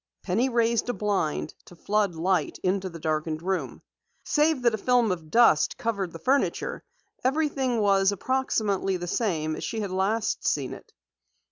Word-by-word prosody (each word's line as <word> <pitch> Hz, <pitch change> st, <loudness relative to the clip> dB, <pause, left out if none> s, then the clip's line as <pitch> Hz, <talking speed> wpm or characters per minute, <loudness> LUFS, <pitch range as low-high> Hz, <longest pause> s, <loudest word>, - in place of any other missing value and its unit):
Penny 225 Hz, +8 st, +1 dB
raised 235 Hz, 0 st, +1 dB
a -, -, +1 dB
blind 190 Hz, -, -1 dB
to 175 Hz, -, -14 dB
flood 200 Hz, 0 st, 0 dB
light 180 Hz, +3 st, 0 dB
into 190 Hz, 0 st, 0 dB
the 170 Hz, -, -9 dB
darkened 155 Hz, 0 st, -2 dB
room. 190 Hz, 0 st, -3 dB, 0.4 s
Save 300 Hz, -3 st, +2 dB
that 235 Hz, -2 st, +4 dB
a -, -, 0 dB
film 245 Hz, -2 st, +3 dB
of 165 Hz, -4 st, -5 dB
dust 230 Hz, -6 st, +4 dB
covered 200 Hz, -6 st, -2 dB
the 165 Hz, -, -8 dB
furniture, 265 Hz, -, 0 dB, 0.4 s
everything 270 Hz, -3 st, +1 dB
was 195 Hz, -1 st, +3 dB
approximately 205 Hz, -4 st, 0 dB
the 175 Hz, -, -5 dB
same 165 Hz, -6 st, -1 dB
as -, -, -7 dB
she 225 Hz, -, -3 dB
had 200 Hz, -3 st, -4 dB
last 200 Hz, +4 st, 0 dB
seen -, -, -1 dB
it. -, -, -13 dB
200 Hz, 160 wpm, -26 LUFS, 180-235 Hz, 0.4 s, that